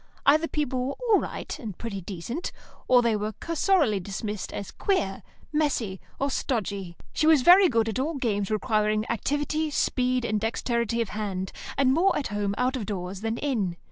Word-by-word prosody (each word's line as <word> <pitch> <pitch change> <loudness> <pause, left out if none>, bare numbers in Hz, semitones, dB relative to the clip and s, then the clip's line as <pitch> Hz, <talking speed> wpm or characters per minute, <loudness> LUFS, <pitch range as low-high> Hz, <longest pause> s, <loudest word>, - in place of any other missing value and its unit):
Either 310 +4 +5
people 265 -5 -1
were 275 - -2 0.2
"all 410 - +7
right," - - -5
and 215 - -6
"pretty 205 -4 -5
decent," 200 - -5 0.4
or 245 -1 +6
they 230 -2 +2
were 210 +1 -2
cursorily 325 - +2
dismissed 205 +2 -4
as 200 - -5
"queer," 200 - 0 0.3
"messy," 255 -11 0 0.2
or 275 0 0
"stodgy." 200 -10 -2 0.2
She 310 - +2
was 310 -5 +6
very 360 +3 +8
good 225 -3 +2
at 225 +3 -2
all 305 +5 -1
games 205 -7 -1
requiring 215 0 +1
activity, 290 +6 -1
speed, 255 -3 +1
and 215 -2 0
dexterity 235 0 0
of 225 - -2
hand, 195 -3 -3 0.3
and 265 -1 +4
more 355 +6 +3
at 290 - -2
home 205 -1 -1
out 255 +2 +1
of 230 -6 -4
doors 190 -1 -4
than 225 +1 -1
in. 215 -12 -1
230 Hz, 175 wpm, -26 LUFS, 205-280 Hz, 0.4 s, very